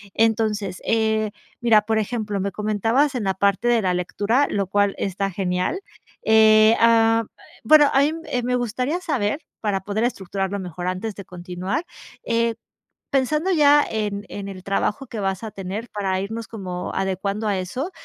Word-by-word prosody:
entonces, 215 -4 0
eh, 220 -1 +1 0.3
mira, 220 -3 +5
por 220 0 +1
ejemplo, 215 -2 -2
me 200 +1 -2
comentabas 225 +8 +1
en 235 -5 -2
la 190 -1 0
parte 200 +4 +1
de 235 -3 +3
la 180 -1 +1
lectura, 205 +9 +1
lo 200 -1 0
cual 205 +1 +1
está 195 +1 -2
genial, 185 - -1 0.4
eh 220 0 +6
ah 225 0 +4
eh, - - -20
bueno, 295 +3 +6
ahí 280 +3 +4 0.3
me 250 0 0
gustaría 250 +7 -1
saber 280 - -1 0.2
para 200 -3 0
poder 210 +3 -2
estructurarlo 195 -3 -2
mejor 180 -1 -5
antes 195 +4 -3
de 200 - -10
continuar, 180 - -4 0.4
eh, 230 0 +1 0.6
pensando 300 +7 +1
ya 295 -4 +5
en 210 -2 -2
en 200 -1 -6
el 185 -2 -8
trabajo 210 +6 -1
que 225 - -6
vas 195 0 -2
a 220 - -5
tener 200 +4 -6
para 190 -2 -1
irnos 225 +3 -5
como 185 -5 -5
adecuando 195 +3 -2
a 200 -2 0
eso, 255 - -4
215 Hz, 165 wpm, -22 LUFS, 195-230 Hz, 0.6 s, eh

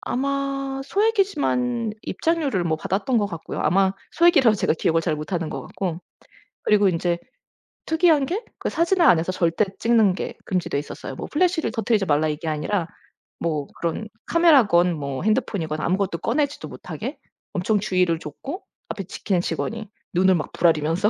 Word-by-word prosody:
아마 275 0 -2
소액이지만 285 - +1
입장료를 300 - 0
뭐 160 -2 +1
받았던 195 +9 -1
것 205 - +1
같고요. 165 -5 -6
아마 190 +1 +3 0.2
소액이라 330 -9 +5
제가 - - +1
기억을 165 0 +2
잘 160 -1 0
못하는 160 +1 -3
것 - - -4
같고 175 -3 -4 0.6
그리고 205 -2 +4
인제 170 0 0 0.7
특이한 320 -3 +3
게 405 - -2 0.2
그 - - -2
사진을 340 +1 +2
안에서 170 +2 +4
절대 170 +3 +2
찍는 225 -4 +4
게 - - -5
금지돼 180 -6 -1
있었어요. 145 - -7
뭐 - - -6
플래시를 340 -1 +1
터트리지 225 -3 +1
말라 150 0 +2
이게 150 +2 -4
아니라 160 +4 -1 0.5
뭐 155 -4 -2
그런 170 +6 -2 0.2
카메라건 225 - +5
뭐 140 -1 -4
핸드폰이건 200 -9 0
아무것도 185 -1 0
꺼내지도 285 +4 -1
못하게 - - -6 0.4
엄청 205 +2 +1
주의를 180 -4 +1
줬고 270 - -7 0.3
앞에 195 - -4
지키는 190 -1 -1
직원이 215 +6 -3 0.2
눈을 185 +1 +4
막 160 - -3
부라리면서 165 +4 +2
200 Hz, 365 characters per minute, -23 LUFS, 170-275 Hz, 0.7 s, 소액이라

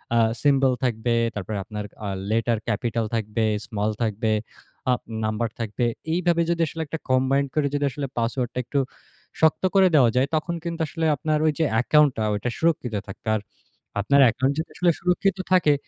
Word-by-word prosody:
আ - - +4 0.3
symbol 135 -2 +4
থাকবে, 120 -1 0 0.2
তারপরে 105 +1 -4
আপনার 105 +2 -6 0.2
আ - - -2 0.2
লেটার 115 +1 +1
ক্যাপিটাল 115 -2 -1
থাকবে, 110 0 -1 0.2
স্মল 105 -2 -1
থাকবে, 110 +1 0 0.6
আ - - +5 0.3
নাম্বার 110 +2 -1
থাকবে। 115 +2 -1 0.3
এইভাবে 170 -1 +2
যদি 170 -1 +1
আসলে 160 - -5
একটা 160 +2 -4
কম্বাইন 130 +2 +3
করে 155 -2 +1
যদি 145 0 +1
আসলে 140 +2 -4
পাসওয়ার্ডটা 120 +1 -1
একটু 140 +4 0 0.6
শক্ত 160 +2 +3
করে 190 -1 +7
দেওয়া 130 -5 +6
যায়, 130 +2 +3
তখন 170 +2 -1
কিন্তু 170 -1 -4
আসলে 165 +1 -3
আপনার 155 +3 0
ওই 155 - +4
যে 160 - +3
অ্যাকাউন্টটা 130 +1 +3
ওইটা 105 +4 -2
সুরক্ষিত 150 -9 0
থাকবে। 100 - -11
আর 110 - -2 0.6
আপনার 140 +8 +3
অ্যাকাউন্ট 130 +3 +2
যদি 160 - -3
আসলে 175 -1 +3
সুরক্ষিত 180 +2 +1 0.2
থাকে, 170 -5 +5
130 Hz, 170 wpm, -24 LUFS, 115-155 Hz, 0.6 s, করে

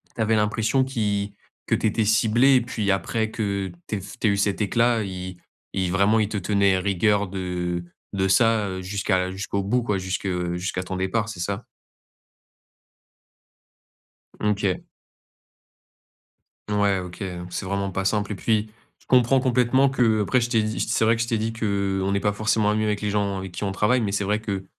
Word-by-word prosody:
tu 115 - -3
avais 110 0 +2
l'impression 110 +4 +2
qui 105 -5 -2 0.3
que - - +3
tu - - -2
étais 110 0 +1
ciblée 115 +5 +4
et 125 - +5
puis 110 -4 -1
après, 110 +4 0
que 100 -4 -2 0.2
tu - - -1
aies - - -4
tu 95 - -3
aies 100 - +4
eu 100 - 0
cet 100 +1 0
éclat, 115 +2 +2
ils 95 -2 -6 0.4
ils 95 -2 0
vraiment, 100 +4 +3
ils 105 -1 +1
te 105 - -3
tenaient 100 0 +2
rigueur 100 +2 +1
de 90 -2 -3 0.3
de 95 -1 +1
ça, 110 +1 +3
heu, 95 0 -5
jusqu'à 95 -1 -1
jusqu'au 100 +1 -3
bout 120 +5 +1
quoi, 105 -4 0
jusque 95 +1 -3 0.3
jusqu'à 90 +1 -3
ton 95 +1 -5
départ, 95 +4 0
c'est 105 -6 -6
ça? 100 +5 -3 2.7
OK. 100 -3 0 1.9
Ouais. 100 -2 +2
OK. 90 +1 -8
Heu, 90 -2 -5
c'est 90 - -4
vraiment 100 +1 -2
pas 95 +1 -2
simple 105 +1 0
et - - -5
puis 110 +1 0 0.3
je - - -26
comprends 125 +1 +4
complètement 130 +1 +3
que 115 -5 +2
après, 125 +5 +2
je 120 - -1
t'ai 115 -3 +3
dit 110 0 -3
c'est 110 0 +1
vrai 115 - +4
que 115 - -2
je 115 - -1
t'ai 115 -1 0
dit 110 +1 -2
qu'on 100 -3 -1
n'est 100 - +1
pas 105 0 0
forcément 105 0 +1
mieux 110 0 +1
avec 105 -1 0
les 105 - -1
gens 100 -1 0
avec 95 -1 -6
qui 90 - -5
on 100 - -1
travaille 105 +6 +2
mais 105 -3 -1
c'est 100 0 -1
vrai 105 +2 0
que 100 -3 -4
105 Hz, 195 wpm, -24 LUFS, 95-110 Hz, 2.7 s, et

